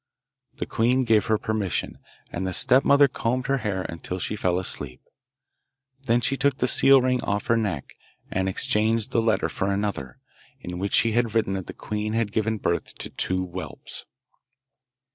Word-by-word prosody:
The - - -4
queen 125 +3 +1
gave 110 -3 +2
her 110 - +3
permission, 105 -4 -2 0.3
and 95 +2 -3
the 95 - -3
stepmother 140 +6 +5
combed 125 0 -2
her 135 0 +1
hair 100 -5 -2
until 85 +2 -6
she 95 - -3
fell 90 -4 0
asleep. 70 -8 -3 1.1
Then 120 +1 +3
she 135 - +1
took 135 0 +1
the 125 - +1
seal 135 +1 +6
ring 125 -1 +1
off 100 0 -2
her 115 - +2
neck, 100 -11 -3 0.4
and 95 0 0
exchanged 110 +3 +1
the 115 - +2
letter 110 -1 +1
for 95 +1 -2
another, 100 -11 -3 0.4
in 90 0 -7
which 100 +1 -3
she 115 - +4
had 115 -1 0
written 110 -4 +1
that 95 -2 -4
the - - -7
queen 105 0 -4
had 115 -2 0
given 110 +1 0
birth 85 -4 -2
to - - -8
two 95 0 -1
whelps. 90 +1 -7
110 Hz, 175 wpm, -25 LUFS, 95-115 Hz, 1.1 s, seal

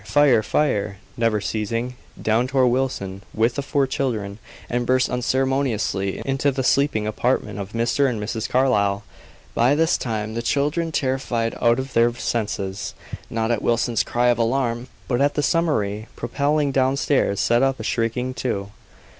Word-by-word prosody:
fire! 125 +2 +4
fire!" 105 -6 0 0.2
never 115 -2 +1
ceasing, 115 +4 -2 0.2
down 115 +3 +1
tore 130 -1 +3
Wilson 120 -7 -1
with 115 +2 +2
the 140 - -2
four 140 0 +1
children, 110 -7 -2 0.3
and 120 0 -1
burst 130 0 +2
unceremoniously 125 -6 0
into 135 +1 +1
the 130 0 -2
sleeping 135 -5 +2
apartment 105 -1 -1
of 100 +1 -6
Mr. 120 +4 +2
and 115 -4 -3
Mrs. 110 +1 -3
Carlyle. 105 -6 +2 0.5
By 125 +5 +3
this 160 +2 +2
time 110 -2 -3
the 115 - -2
children, 150 +7 0
terrified 130 -5 -1
out 115 0 +4
of 130 0 -4
their 115 +1 +4
senses, 100 -5 -3 0.3
not 115 0 -1
at 115 - 0
Wilson's 120 0 +1
cry 120 +1 +1
of 120 -1 +2
alarm, 120 0 0 0.2
but 125 0 0
at 145 +1 +2
the 150 - 0
summary 110 - 0
propelling 140 +4 0
downstairs, 130 -5 +1
set 120 +1 +3
up 135 0 +1
a - - -5
shrieking, 125 +2 -1
too. 100 -6 -3
120 Hz, 155 wpm, -22 LUFS, 110-135 Hz, 0.5 s, fire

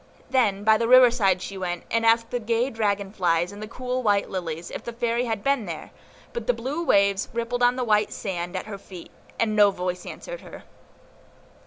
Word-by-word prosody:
Then 210 -7 +2
by 220 0 +5
the 230 - +1
river 255 0 +8
side 195 -6 +1
she 195 -1 -6
went, 175 -2 -3
and 230 0 +1
asked 230 0 +3
the 245 - -1
gay 235 +3 0
dragon 205 -3 -1
flies, 175 -3 +1
and 205 +1 -10
the 215 - -5
cool 250 +2 -3
white 205 -4 +1
lilies, 170 -3 -4
if - - -6
the 235 - -6
Fairy 235 +1 0
had 225 -3 -3
been 275 -7 +1
there; 165 -2 -7 0.4
but 475 - -5
the - - +3
blue 290 +7 -3
waves 200 - +2
rippled 235 +1 -2
on 245 0 +4
the 255 - -1
white 210 -2 +2
sand 175 -2 -4
at 185 - -3
her 205 -2 -7
feet, 185 -3 -11 0.3
and 215 -2 +1
no 205 -1 +6
voice 180 -2 -4
answered - - -8
her. - - -11
215 Hz, 210 wpm, -25 LUFS, 195-240 Hz, 0.4 s, river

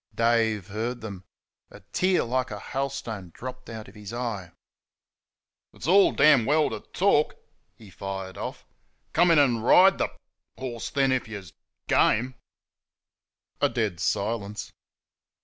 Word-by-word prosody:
Dave 115 -3 +2
heard 115 +4 -3
them. 100 -4 -8 0.4
A - - -14
tear 185 0 +2
like 130 +2 -1
a 105 - -6
hailstone 130 -7 -4
dropped 130 0 -8
out 110 -2 -7
of - - -14
his 105 -1 -9
eye. 115 -7 -4 1.2
"It's - - -9
all 195 +5 +6
damn 140 -4 +5
well 150 +2 +3
t' - - -4
TALK," 180 -6 +2 0.4
he 105 -4 -15
fired 95 +1 -6
off; - - -6 0.5
"come 175 +2 +4
in 165 - +5
and 125 -6 +3
RIDE 190 +10 +6
th' - - +1 0.5
horse 120 -3 -5
then, 135 -2 +2
if 130 -2 0
y' 110 - -7
s' 95 -5 -9 0.3
GAME!" 125 +4 +3 1.3
A - - +4
dead 105 -8 -2
silence. 105 +3 -2
115 Hz, 140 wpm, -26 LUFS, 105-135 Hz, 1.3 s, all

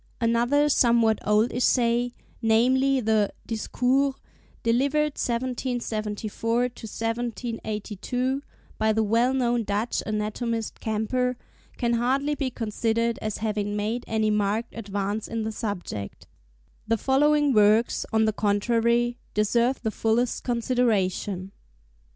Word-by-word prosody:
Another 240 +5 +2
somewhat 235 -5 +3
old 210 +3 +3
essay, 240 0 +2 0.3
namely, 255 +4 +3
the 215 -2 +2 0.2
'Discours,' 255 +4 0 0.5
delivered 280 +6 +2
1774 235 -3 -2
1782, 235 +1 -3 0.4
by 220 0 +3
the 220 0 +2
well 230 +4 +2
known 240 -3 +1
Dutch 210 +3 -1
anatomist 220 +2 -2
Camper, 245 +3 -1 0.4
can 235 -2 0
hardly 265 +5 +1
be 280 -3 -2
considered 230 0 -1
as 215 -1 -3
having 205 -1 -1
made 215 +4 -2
any 220 -1 +1
marked 210 +3 0
advance 205 -1 -3
in 225 -1 -3
the 220 - -2
subject. 190 - -5 0.6
The 225 +1 +2
following 290 +3 +3
works, 215 +2 +4
on 220 -1 +3
the 215 - +1
contrary, 235 +4 +1 0.2
deserve 235 +5 +1
the 220 - 0
fullest 230 +3 0
consideration. 210 -6 0
230 Hz, 110 wpm, -25 LUFS, 215-245 Hz, 0.6 s, works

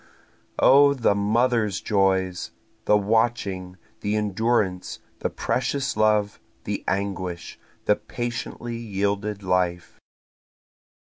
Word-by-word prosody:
O 140 +1 +6
the 120 -5 +2
mother's 110 0 +1
joys! 95 -3 +1 0.4
The 105 - +5
watching, 100 -4 0 0.2
the 105 +1 -1
endurance, 105 -2 0 0.2
the - - -1
precious 135 +2 -1
love, 105 -1 +2 0.2
the - - -3
anguish, 95 -3 -3 0.3
the 105 - +3
patiently 120 0 -5
yielded 100 -1 -2
life. 90 -1 -1
105 Hz, 90 wpm, -24 LUFS, 95-115 Hz, 0.4 s, O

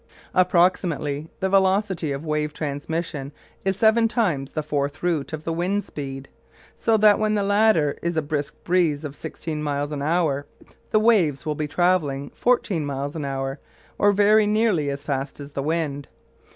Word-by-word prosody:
Approximately, 170 -4 +1
the 190 - +1
velocity 190 -4 +2
of 140 +3 -4
wave 150 -1 -1
transmission 145 0 -4 0.3
is 195 0 0
seven 225 +1 +4
times 175 - 0
the 155 - -2
fourth 145 +1 -2
root 160 -6 0
of 155 -1 -5
the 165 - -2
wind 185 +5 0
speed; 135 -2 -7 0.5
so 225 -1 +2
that 210 -1 +5
when 215 0 +1
the 205 - +1
latter 200 -7 +3
is 170 -1 -2
a 160 - +1
brisk 145 -1 -3
breeze 165 -4 +1
of 145 -1 -6
sixteen 155 0 -5
miles 145 0 -2
an 145 -2 -3
hour 150 -2 0 0.4
the 215 - +3
waves 190 -11 +3
will 155 - 0
be 150 0 -3
travelling 145 -4 +1
fourteen 220 -9 +1
miles 140 +1 -4
an 150 -3 -3
hour, 135 0 -3 0.4
or 205 - +5
very 210 +1 +4
nearly 210 -9 +2
as 140 +1 -4
fast 140 -1 -3
as 145 0 -8
the 140 - -3
wind. 150 -2 -2
155 Hz, 170 wpm, -23 LUFS, 145-190 Hz, 0.5 s, that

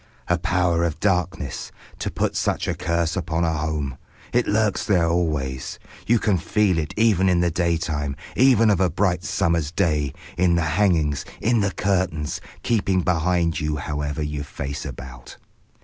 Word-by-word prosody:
A 90 0 +1
Power 85 -1 +1
of 85 -3 -1
Darkness. 90 -7 -1 0.3
To - - -2
put - - -1
such - - 0
a - - +1
curse 85 -1 -1
upon 85 -2 -1
a 80 -1 +1
home! 75 -4 -2 0.3
It 120 0 +2
lurks 105 -1 +1
there 90 -5 +2
always. 75 -7 -1 0.3
You 120 - +5
can 105 -4 +1
feel 100 0 +2
it 75 -2 -4
even 105 -4 +4
in 90 -1 +3
the 85 -1 +2
daytime, 80 -4 -1 0.2
even 120 -4 +5
of 100 - +2
a 95 -2 +3
bright 90 0 0
summer's 85 -7 0
day, 75 -4 0 0.3
in 90 -2 +4
the 85 - +2
hangings, 80 -8 +2 0.2
in 115 +1 +2
the 100 -1 +2
curtains, 90 -6 -1 0.2
keeping 100 -5 +1
behind 85 -1 +1
you 75 0 -1
however 75 0 -3
you 75 -1 -3
face 70 0 -5
about. 65 -1 -10
85 Hz, 165 wpm, -23 LUFS, 75-95 Hz, 0.3 s, You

